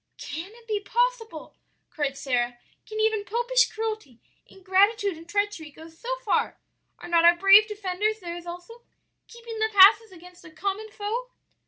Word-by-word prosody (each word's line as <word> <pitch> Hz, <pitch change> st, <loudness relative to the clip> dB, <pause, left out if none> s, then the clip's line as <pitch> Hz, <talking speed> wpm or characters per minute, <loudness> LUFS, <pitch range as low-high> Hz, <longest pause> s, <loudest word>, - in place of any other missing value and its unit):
"'Can 335 Hz, +5 st, -7 dB
it 470 Hz, -1 st, -19 dB
be 425 Hz, -2 st, -1 dB
possible?' 460 Hz, -5 st, -2 dB, 0.4 s
cried 285 Hz, -3 st, -3 dB
Sara, 245 Hz, -3 st, -1 dB, 0.3 s
'can 435 Hz, -1 st, -6 dB
even 435 Hz, -1 st, +1 dB
popish 480 Hz, +3 st, +1 dB
cruelty, 435 Hz, -, -5 dB, 0.3 s
ingratitude, 390 Hz, +1 st, +1 dB
and 330 Hz, +1 st, -14 dB
treachery 405 Hz, -5 st, -2 dB
go 320 Hz, +2 st, -14 dB
so 330 Hz, +10 st, -11 dB, 0.2 s
far? -, -, 0 dB, 0.4 s
are -, -, -11 dB
not 340 Hz, -1 st, +3 dB
our 340 Hz, +1 st, +7 dB
brave 390 Hz, +4 st, +6 dB
defenders 420 Hz, +1 st, -2 dB
theirs 345 Hz, -2 st, -8 dB
also? 355 Hz, +7 st, -10 dB, 0.5 s
keeping 465 Hz, -1 st, -10 dB
the 440 Hz, 0 st, +1 dB
passes 415 Hz, +2 st, +6 dB
against 360 Hz, 0 st, -16 dB
a 350 Hz, -, -13 dB
common 400 Hz, +6 st, -4 dB
foe?' 435 Hz, +5 st, -5 dB
405 Hz, 155 wpm, -25 LUFS, 345-440 Hz, 0.5 s, our